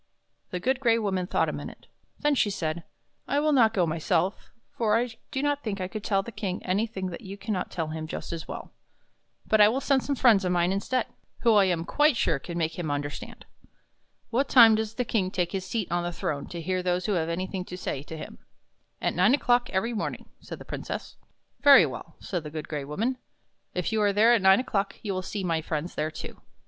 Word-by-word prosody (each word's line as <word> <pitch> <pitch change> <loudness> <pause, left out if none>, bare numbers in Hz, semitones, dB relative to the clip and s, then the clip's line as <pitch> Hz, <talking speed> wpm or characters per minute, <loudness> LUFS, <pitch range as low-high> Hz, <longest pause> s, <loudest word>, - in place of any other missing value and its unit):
The 180 - -3
Good 255 +6 0
Gray 230 -3 +3
Woman 190 -5 -1
thought - - +1
a - - -1
minute. - - -8 0.4
Then 295 0 +3
she 245 -6 +2
said: 170 -4 -3 0.2
" - - -46
I 285 - +1
will 305 +1 +2
not 240 -6 +5
go 190 -6 +2
myself, 165 +3 -1 0.3
for 220 -1 +2
I 240 +1 -1 0.2
do 265 - -2
not 290 0 +1
think 210 -3 -3
I 185 - -2
could 210 +2 -6
tell 195 -2 +1
the 235 - -8
King 200 -3 -4
anything 190 -1 -1
that 170 - -7
you 200 -2 -8
can 210 +2 -3
not 185 - -2
tell 160 -3 -3
him 155 0 -5
just 160 - -6
as 165 -1 -6
well. - - -7 0.7
But 220 -1 +4
I 210 - +9
will 240 +5 +1
send 275 -1 +2
some 285 - -1
friends 230 -7 +5
of 180 - 0
mine 175 0 +2
instead, 230 +6 0 0.4
who 230 -2 +5
I 205 -2 +6
am 170 -3 0
quite 295 - +3
sure 155 -9 +1
can 170 +4 -6
make 160 0 -1
him 165 -4 -2
understand. 145 0 -5 0.9
What 270 +4 +1
time 230 -4 +8
does 220 0 -1
the 250 - -1
King 210 -6 0
take 180 -3 -1
his 190 -1 -4
seat 220 -7 -2
on 175 0 0
the 175 - -2
throne 145 -4 -3
to 170 - -6
hear 185 +2 -1
those 180 0 0
who - - 0
have 165 -4 0
anything 185 +2 -3
to 180 - -7
say 140 -6 -3
to 160 +2 -8
him?" - - -9 0.3
" - - -46
At - - +1
nine 260 - +4
o'clock 245 -3 +2
every 200 +5 -1
morning," 210 - -4
said - - -8
the - - -12
Princess. - - -6 0.2
" - - -47
Very 280 - +9
well," 140 +4 -7
said 180 -3 -3
the 150 - -7
Good 155 0 -6
Gray 145 -3 -4
Woman. 225 - -2 0.3
" - - -48
If 180 +2 -1
you 220 -1 +1
are 205 -1 +3
there 225 +4 +5
at 230 - +3
nine 190 +1 +6
o'clock, 200 -5 -1
you 205 -3 -2
will 185 - -2
see 195 +1 -4
my 165 -3 0
friends 155 +1 -3
there, 155 +1 -1
too." - - -9
195 Hz, 240 wpm, -27 LUFS, 170-230 Hz, 0.9 s, I